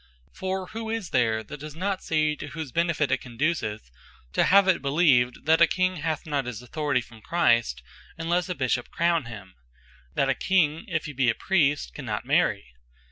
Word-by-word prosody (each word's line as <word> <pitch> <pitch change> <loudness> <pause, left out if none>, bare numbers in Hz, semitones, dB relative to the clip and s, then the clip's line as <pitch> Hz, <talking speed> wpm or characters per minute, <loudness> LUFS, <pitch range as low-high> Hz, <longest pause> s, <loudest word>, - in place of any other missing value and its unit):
For 190 0 -3
who 225 0 -5
is 225 -5 -3
there 110 -3 +2
that 150 +7 -9
does 150 0 -8
not 190 +2 -2
see, 155 -1 +1
to 145 - -7
whose 150 -2 -6
benefit 165 -4 +1
it 135 - +1
conduceth, 120 - -2 0.4
to - - +3
have 195 0 +5
it 185 - +3
believed, 140 -5 +2
that 160 +1 +4
a 170 - +8
King 185 +1 0
hath 155 -1 -3
not 145 -4 -1
his 120 -1 -6
Authority 140 0 -1
from 115 -2 -15
Christ, 115 - +1 0.3
unlesse 170 +2 0
a 180 - -2
Bishop 125 -3 -1
crown 170 -4 +1
him? 105 -5 -10 0.6
That 140 - +2
a 135 - +3
King, 165 -1 +1
if 170 -5 -2
he 150 - -6
be 130 -2 +2
a 115 - +1
Priest, 145 - +1
cannot - - -4
Marry? - - +1
150 Hz, 190 wpm, -26 LUFS, 125-170 Hz, 0.6 s, a